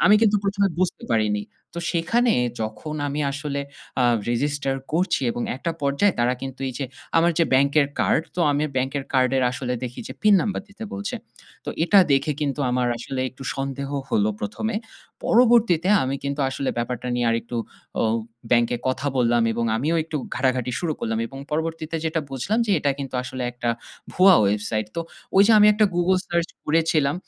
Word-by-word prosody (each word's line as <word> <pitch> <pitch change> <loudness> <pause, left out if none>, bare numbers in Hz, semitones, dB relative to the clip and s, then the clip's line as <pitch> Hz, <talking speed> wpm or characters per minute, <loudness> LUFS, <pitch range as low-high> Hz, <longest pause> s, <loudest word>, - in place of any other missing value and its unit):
আমি 205 - +7
কিন্তু 210 -2 +4
১ 200 0 0
এ - - -7
বুঝতে 185 -2 -1
পারিনি। 105 -2 +1 0.3
তো - - -4
সেখানে 230 +9 +2 0.3
যখন 110 +8 -4
আমি 145 +2 -2
আসলে 145 -1 -3 0.4
আ - - +4 0.3
রেজিস্টার 135 +2 0 0.2
করছি, 180 -1 +1
এবং 120 - -3
একটা 165 +5 -3
পর্যায়ে 140 +8 +2
তারা 120 +1 +3
কিন্তু 135 0 -6
এই - - -5
যে 135 - -2 0.3
আমার 170 +1 +5
যে 165 - +5
ব্যাংকের 140 +2 +4
কার্ড, - - +2
তো 180 - -2
আমি 145 +1 +1
ব্যাংকের 135 +1 -1
কার্ডের 130 0 +3
আসলে 125 0 -3
দেখি 125 -1 -5
যে - - -5
পিন 210 -1 +6
নাম্বার 205 - -2
দিতে 205 +2 -9
বলছে। 100 +1 -4 0.5
তো - - -7 0.2
এটা 200 +3 +5
দেখে 140 +2 +2
কিন্তু 145 0 -1
আমার 125 0 +1
আসলে 130 +2 -4
একটু 130 - -12
সন্দেহ 135 0 -3 0.2
হলো 105 0 +2
১ 105 - -5
এ। - - 0 0.5
পরবর্তীতে, 225 -7 +4 0.2
আমি 135 +1 -1
কিন্তু 140 +1 -2
আসলে 135 0 -3
ব্যাপারটা 125 +1 -3
নিয়ে 120 -1 0
আরেকটু 115 +1 -2 0.4
অ - - +3 0.5
ব্যাংকে 120 0 +3
কথা 135 +2 -2
বললাম 120 -1 +3
এবং 115 +1 -1
আমিও 155 +8 0
একটু 160 -2 -4 0.2
ঘাটাঘাটি 130 -1 0
শুরু 165 -3 -1
করলাম। 110 0 -1
এবং 135 +3 -10
পরবর্তীতে 160 +1 -2
যেটা 160 0 0
বুঝলাম 185 - -1
যে - - -1
এটা 145 -1 +1
কিন্তু 135 -2 -6
আসলে 130 0 -5
একটা 120 -1 -4 0.4
ভুয়া 185 0 +7
ওয়েবসাইট। 105 +1 0
তো - - 0 0.4
ওই 195 - +8
যে 225 - +5
আমি 210 - +7
একটা 215 +1 +3
Google 180 +2 +3
সার্চ 170 -1 0 0.2
করেছিলাম 155 -2 +2
140 Hz, 185 wpm, -23 LUFS, 125-170 Hz, 0.5 s, ওই